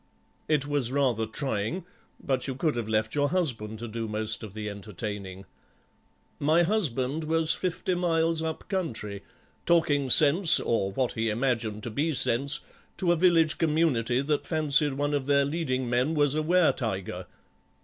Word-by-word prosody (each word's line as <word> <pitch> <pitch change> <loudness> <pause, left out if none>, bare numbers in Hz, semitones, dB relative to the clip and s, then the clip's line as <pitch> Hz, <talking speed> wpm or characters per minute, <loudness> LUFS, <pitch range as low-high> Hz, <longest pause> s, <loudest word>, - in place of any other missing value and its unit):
"It 150 -3 +1
was 145 -4 0
rather 125 -5 +1
trying, 135 - -3 0.3
but 130 -2 -2
you 135 - -3
could 150 +1 0
have 120 -2 -3
left 110 0 0
your 145 -1 +1
husband 120 - -1
to 120 +2 -6
do 115 0 -4
most 110 +1 -1
of 110 -3 -9
the 105 -1 -5
entertaining." 100 -1 -6 0.9
"My 155 +4 +3
husband 160 - -1
was 160 0 +3
fifty 185 +1 -2
miles 165 -2 +1
up 160 -1 -4
country, 115 - -4 0.5
talking 155 -5 +2
sense, 160 +6 +6
or 100 -4 -1
what 125 +5 -1
he 110 0 -1
imagined 110 -2 -1
to 120 - -5
be 150 +6 -1
sense, 135 +4 +1 0.4
to 175 -2 +1
a - - +4
village 165 -2 +3
community 150 -7 +1
that 145 +1 -1
fancied 150 -3 +2
one 145 +1 -1
of 140 -2 -1
their 140 -1 +3
leading 140 -4 -2
men 125 +6 0
was 145 -2 +3
a 155 - 0
were 175 +2 +3
tiger." 95 -7 -4
140 Hz, 160 wpm, -27 LUFS, 115-160 Hz, 0.9 s, sense